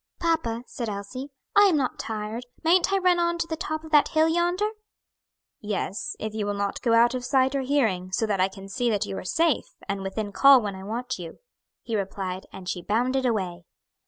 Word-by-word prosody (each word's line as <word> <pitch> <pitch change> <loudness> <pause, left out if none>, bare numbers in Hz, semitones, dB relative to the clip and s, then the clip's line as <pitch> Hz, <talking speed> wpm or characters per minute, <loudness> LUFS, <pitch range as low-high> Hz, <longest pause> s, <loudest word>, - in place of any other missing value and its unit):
"Papa," 320 -9 0
said 235 -3 -5
Elsie, 210 +7 -6 0.3
"I 410 0 +8
am 365 -6 +4
not 265 -3 -1
tired, 220 +2 -4 0.2
mayn't 360 +4 +4
I 390 - +3
run 365 -2 +3
on 340 0 +1
to 335 - -1
the 325 -1 -3
top 315 -1 -4
of 315 - -11
that 295 -2 +6
hill 315 +1 +3
yonder?" 350 +5 +1 0.9
"Yes, 205 -1 -3
if 215 0 -4
you 215 -2 -2
will 205 - -1
not 200 0 -2
go 230 -2 +3
out 235 +2 +5
of 255 -1 -3
sight 265 +1 +2
or 275 - 0
hearing, 225 -10 0
so 225 - +1
that 200 -3 0
I 185 - +4
can 195 0 -11
see 235 +5 -1
that 205 -3 0
you - - -5
are - - -8
safe, 320 - 0
and 200 0 -2
within 205 +2 -3
call 275 +5 +7
when 205 -4 -3
I 190 - -9
want 240 +3 -4
you," 170 -2 -8 0.5
he 230 - -3
replied, 190 -2 -3
and 185 -2 -10
she 180 0 -2
bounded 250 +7 +1
away. 185 -6 -2
235 Hz, 215 wpm, -26 LUFS, 200-305 Hz, 0.9 s, I